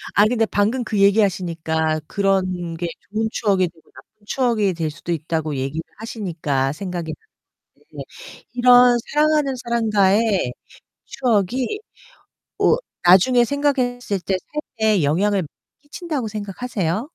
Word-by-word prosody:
아이 205 +1 +6
근데 225 -2 +2
방금 220 +5 0
그 215 -2 -2
얘기하시니까 170 -6 +1
그런 185 -4 0
게 170 +1 -3 0.2
좋은 220 +2 -1
추억이 195 -5 +1
되고 160 -1 -26
나쁜 - - -16 0.2
추억이 220 -5 +1
될 165 -2 -2
수도 170 +3 -7
있다고 160 -1 -2
얘기를 135 +4 -3 0.2
하시니까 160 - -2
생각이 175 -1 -5 0.6
나는데 - - -11 0.5
이런 245 0 +6
사랑하는 300 -2 +2
사람과의 210 - +2 0.5
추억이 245 - 0 0.8
어 - - +4 0.3
나중에 215 +8 +6
생각했을 245 -6 -1
때 190 +1 -1 0.4
삶에 215 -4 +3
영향을 190 +7 +1 0.4
끼친다고 290 -4 -4
생각하세요? 210 - -3
205 Hz, 290 characters per minute, -21 LUFS, 175-240 Hz, 0.8 s, 아이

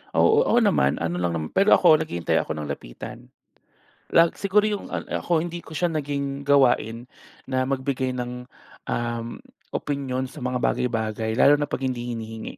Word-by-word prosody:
Oo, 445 +1 +5
ako 240 - +4
naman, 125 - +3
ano 85 +1 -2
lang 85 -1 0
naman 80 -1 -3
Pero, 200 +2 +6
ako 160 -4 +6
naghihintay 85 - 0
ako 80 - -5
na 75 -1 -4
lapitan. - - -9 0.8
Lag 165 0 +5
siguro 205 +1 +2
yung, 210 -2 -2
ah, - - -4 0.2
ako 170 -2 +1
hindi 175 0 -6
ko 160 -2 -8
siya 175 - +1
naging 140 -2 -3
gawain 125 -5 +2 0.4
na 130 -1 0
magbigay 130 -1 -1
ng, 125 +1 -5 0.4
um, 120 -1 -2 0.4
opinyon 135 -3 -2
sa 135 +2 -10
mga 125 0 -1
bagay-bagay, 110 -3 -1
lalo 140 - +6
na 145 - -1
'pag 135 - -2
hindi 120 -2 -3
hinihingi. 110 0 -7
130 Hz, 165 wpm, -24 LUFS, 115-150 Hz, 0.8 s, Pero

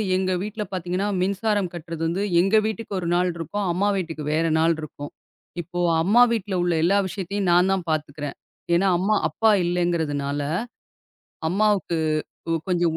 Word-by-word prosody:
எங்க 185 0 0
வீட்டுல 210 +1 -4
பாத்தீங்கன்னா, 180 +2 -2
மின்சாரம் 200 0 0
கட்டுறது 165 -1 -7
வந்து 185 +5 -1 0.2
எங்க 195 +4 +2
வீட்டுக்கு 220 -1 -5
ஒரு 175 - -4
நாள் 180 +1 +2
இருக்கும். 195 +5 -3
அம்மா 200 +3 +1
வீட்டுக்கு 165 -4 -4
வேற 165 +2 +1
நாள் 165 +1 +3
இருக்கும். 145 -1 -8 0.5
இப்போ 175 +2 -6 0.2
அம்மா 220 +7 +5
வீட்டுல 205 -4 -2
உள்ள 175 -1 +1
எல்லா 195 +4 +4
விஷயத்தையும் 195 0 -2
நான் 180 +2 +4
தான் 185 -2 -2
பாத்துக்குறேன். 145 -2 -3 0.4
ஏனா 195 +3 +3
அம்மா, 200 +4 +1
அப்பா 220 -1 +3
இல்லங்கிறதுனால 160 -5 -1 1.1
அம்மாவுக்கு 200 -3 +1 0.5
கொ - - -3 0.2
கொஞ்சம். 175 -3 +1
180 Hz, 150 wpm, -23 LUFS, 165-200 Hz, 1.1 s, அம்மா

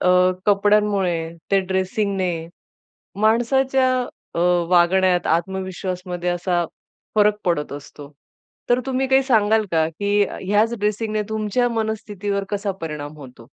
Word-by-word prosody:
अ, 180 - +2 0.4
कपड्यांमुळे 205 -3 +3 0.3
ते 195 - +4
ड्रेसिंगने 190 0 -1 0.9
माणसाच्या 260 +4 +3 0.4
अ, - - -3 0.3
वागण्यात, 180 +1 +3
आत्मविश्वासमध्ये 180 0 -2
असा 175 0 0 0.5
फरक 210 -1 +4
पडत 170 -5 0
असतो. 145 0 -10 0.6
तर 245 +1 +3
तुम्ही 265 0 0
काही 265 0 +4
सांगाल 220 -4 +3
का? 160 -1 +3
की 205 +5 0
ह्याच 210 +4 0
ड्रेसिंगने 210 +1 -1
तुमच्या 220 +3 0
मनस्थितीवर 210 -3 -2
कसा 205 0 -1
परिणाम 150 -2 -6
होतो? 125 -5 -13
200 Hz, 110 wpm, -21 LUFS, 180-215 Hz, 0.9 s, ते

